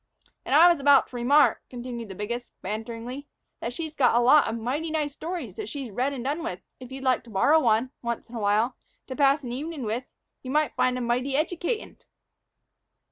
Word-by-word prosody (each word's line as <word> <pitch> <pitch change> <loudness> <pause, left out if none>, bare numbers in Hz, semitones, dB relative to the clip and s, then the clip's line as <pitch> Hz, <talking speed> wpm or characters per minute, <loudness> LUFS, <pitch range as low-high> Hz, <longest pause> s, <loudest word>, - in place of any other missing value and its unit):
"And - - +1
I 330 +3 +9
was 345 -3 +4
about 280 0 +5
to - - -12
remark," 275 +5 +4
continued 240 -3 -7
the 190 - -7
biggest, 235 +5 -5
banteringly, 230 +7 -5 0.3
"that 235 - -4
she's 315 +4 -5
got 255 -6 +3
a - - +5
lot 265 +5 +6
of 225 - -2
mighty 270 +8 -2
nice 300 -2 -1
stories 320 - -5
that - - -5
she's 265 -1 -6
read 255 +7 0
and 260 -4 -5
done 295 +5 -1
with; 335 - -4 0.2
and 255 - -9
if - - -22
you'd 265 0 -7
like 255 -1 +2
to - - -14
borrow 280 +10 +4
one, 235 -1 +2
once 235 -1 -4
in 240 - -16
a 235 - -4
while, 215 +4 +1 0.3
to 260 - -6
pass 280 0 +3
an 245 - -5
evenin' 290 +3 -5
with, 230 +4 -2 0.4
you'd 300 +4 0
find 255 0 +1
'em 250 - -2
mighty 250 +3 0
educatin'." 350 - -2
255 Hz, 210 wpm, -26 LUFS, 235-295 Hz, 0.4 s, I